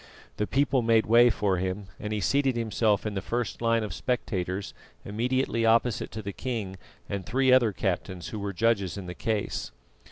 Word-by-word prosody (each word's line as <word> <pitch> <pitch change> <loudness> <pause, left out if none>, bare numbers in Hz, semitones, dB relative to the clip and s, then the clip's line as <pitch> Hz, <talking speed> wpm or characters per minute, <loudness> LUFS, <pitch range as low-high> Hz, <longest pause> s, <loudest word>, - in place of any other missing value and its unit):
The 105 - -1
people 135 -1 +2
made 115 -1 +3
way 120 +2 +6
for 100 -4 +1
him, 95 +3 -2
and 105 - -5
he 105 -1 -1
seated 135 +4 +2
himself 110 -2 +1
in 105 - -2
the 95 - -2
first 120 +3 -3
line 115 -1 +2
of 105 -5 -4
spectators 95 -4 -2 0.3
immediately 115 +2 0
opposite 115 +1 +2
to 110 0 -5
the 100 0 -5
king 110 -7 -4 0.3
and 100 -2 -3
three 130 +7 +2
other 120 -4 +5
captains 95 -2 -3
who 110 - -5
were 100 0 -3
judges 100 -1 +1
in 100 - -6
the 90 - -6
case. 105 - -2
110 Hz, 185 wpm, -27 LUFS, 100-120 Hz, 0.3 s, way